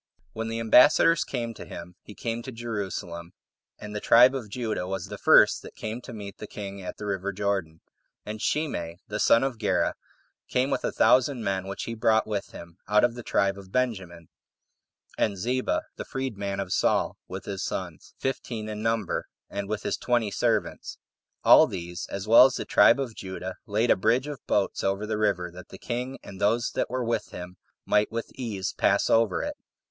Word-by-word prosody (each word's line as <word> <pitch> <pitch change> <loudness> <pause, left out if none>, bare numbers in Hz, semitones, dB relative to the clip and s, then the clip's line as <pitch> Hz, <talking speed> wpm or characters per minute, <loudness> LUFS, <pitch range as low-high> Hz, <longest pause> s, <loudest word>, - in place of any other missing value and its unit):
2. - - -10
When 115 - -2
the 115 0 -3
ambassadors 145 +8 +6
came 115 -3 -4
to - - -9
him, 85 +1 -9
he 105 - -13
came 115 0 -3
to 130 - -7
Jerusalem; 100 -7 -5 0.4
and 105 0 -8
the - - -1
tribe 125 +5 +6
of 125 -6 -5
Judah 110 -5 -3
was 95 -2 -3
the - - -6
first - - +6
that - - -12
came 110 +3 -5
to 125 - -10
meet 100 -3 -8
the 105 - -7
king 100 -1 -7
at 90 - -7
the 105 - -7
river 100 -1 -2
Jordan. 95 -5 -2 0.4
And 105 0 -6
Shimei, 85 - -1
the 105 0 -3
son 115 +4 +5
of 130 -4 -2
Gera, 105 - +1 0.6
came 130 +2 +1
with - - -1
a - - 0
thousand 130 -1 +3
men, 95 -2 -1
which 100 - -5
he 115 - -4
brought 110 0 +2
with 105 -2 -3
him 85 0 -11
out 105 0 +4
of 120 -1 +3
the 120 - -7
tribe 100 -3 0
of 95 -1 -13
Benjamin; 95 -10 -2 0.9
and 100 -2 +1
Ziba, 125 +7 0
the - - -4
freed 130 -3 -4
man 100 -1 -3
of 95 -1 -2
Saul, - - +1
with - - -7
his - - -4
sons, - - -5
fifteen 120 -4 -3
in 105 0 -5
number, 115 -3 -1 0.2
and 100 0 -4
with 105 -1 -3
his - - -1
twenty 120 -4 0
servants. - - -1 0.5
All - - +8
these, 85 -1 -6
as 100 +1 -5
well 115 +4 +9
as 130 - -5
the - - -4
tribe 115 +5 +5
of 130 -4 -3
Judah, 95 -2 -6
laid 110 +3 +2
a - - +6
bridge 115 +7 +2
[of 145 -2 -6
boats] 100 -2 0
over 100 +2 0
the 105 0 -2
river, 95 -5 0
that 90 +1 -12
the - - -10
king, 125 +2 -4
and 95 0 -10
those 115 +4 +2
that - - -1
were 125 0 -2
with 115 0 -1
him, 90 +1 -9 0.3
might 105 0 +2
with 115 0 -4
ease 105 -7 -4
pass - - +2
over 115 -1 +2
it. 295 0 -3
105 Hz, 205 wpm, -26 LUFS, 95-120 Hz, 0.9 s, well